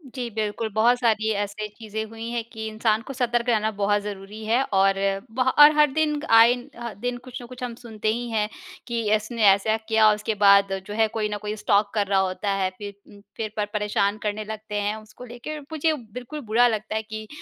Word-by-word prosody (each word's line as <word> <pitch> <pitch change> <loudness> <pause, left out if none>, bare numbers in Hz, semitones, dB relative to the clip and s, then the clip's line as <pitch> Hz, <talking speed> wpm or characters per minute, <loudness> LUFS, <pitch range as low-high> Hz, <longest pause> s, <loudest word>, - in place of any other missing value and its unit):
जी 245 -2 -3
बिल्कुल, 220 +1 -3
बहुत 235 +3 +4
सारी 220 -2 +2
ऐसी 210 +1 -5
चीज़ें 220 0 -6
हुई 225 +1 -7
हैं 235 -1 -2
कि 220 -1 -6
इंसान 220 0 0
को 275 - -8
सतर्क 240 -1 0
रहना 220 -2 +2
बहुत 205 0 +2
ज़रूरी 205 +1 -8
है। 235 +4 +2
और 195 -4 +2 0.4
ब 255 - -2 0.2
और 295 +1 +10
हर 300 -2 +5
दिन 300 0 0
आए 225 +1 +7 0.3
ह 235 -3 -5
दिन 245 0 -1
कुछ 255 -2 -8
ना 240 - -9
कुछ 255 +1 -9
हम 240 -2 -4
सुनते 220 -3 -6
ही 240 +1 -4
हैं 210 -1 0 0.4
कि 235 -1 -1
इसने 220 +1 -3
ऐसा 215 +3 +1
किया 220 -1 +5
और 210 - +5
उसके 210 +1 -3
बाद 200 -1 +6
जो 205 - -6
है 220 0 +3
कोई 215 -1 -2
न 210 - -3
कोई 210 0 -4
स्टॉक 205 -1 +1
कर 205 -2 0
रहा 195 -1 +2
होता 190 +1 -1
है। 195 -1 0
फिर 205 -1 -7
उम, 205 - -16 0.2
फिर 215 -2 -3
पर 210 - +1
परेशान 210 0 0
करने 210 0 -2
लगते 215 -1 -7
हैं 205 +1 -1
उसको 215 +3 -12
लेके। 245 +6 -7
मुझे 315 +2 -1 0.2
बिल्कुल 250 +5 -7
बुरा 230 +3 +4
लगता 215 -1 -2
है 220 - 0
कि, 215 0 -8
220 Hz, 220 wpm, -24 LUFS, 210-235 Hz, 0.4 s, और